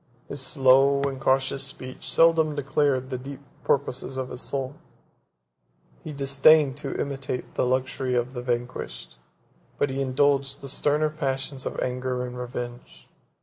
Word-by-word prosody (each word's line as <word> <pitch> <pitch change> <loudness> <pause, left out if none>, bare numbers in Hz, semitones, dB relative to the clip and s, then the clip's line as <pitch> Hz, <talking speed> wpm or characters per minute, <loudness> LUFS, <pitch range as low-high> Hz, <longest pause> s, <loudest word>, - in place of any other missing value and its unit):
His 140 - -1
slow 135 +1 +4
and 135 -1 -2
cautious 135 +1 +1
speech 130 -1 -5
seldom 160 +2 +4
declared 135 -2 0
the 130 - -2
deep 135 +1 -8 0.2
purposes 130 -1 0
of 130 -1 -3
his 125 - -6
soul; 135 -1 -2 1.3
he 155 - -6
disdained 140 0 +4
to - - -4
imitate 135 -2 -4
the - - +1
luxury 130 0 0
of 120 +1 0
the 125 - -4
vanquished; 120 - -4 0.6
but 145 - +1
he 135 +1 -2
indulged 135 +1 +1
the 140 - -6
sterner 150 +3 +1
passions 135 -3 -3
of - - -4
anger 125 0 -2
and 125 0 -7
revenge. 120 0 -7
135 Hz, 145 wpm, -26 LUFS, 130-140 Hz, 1.3 s, slow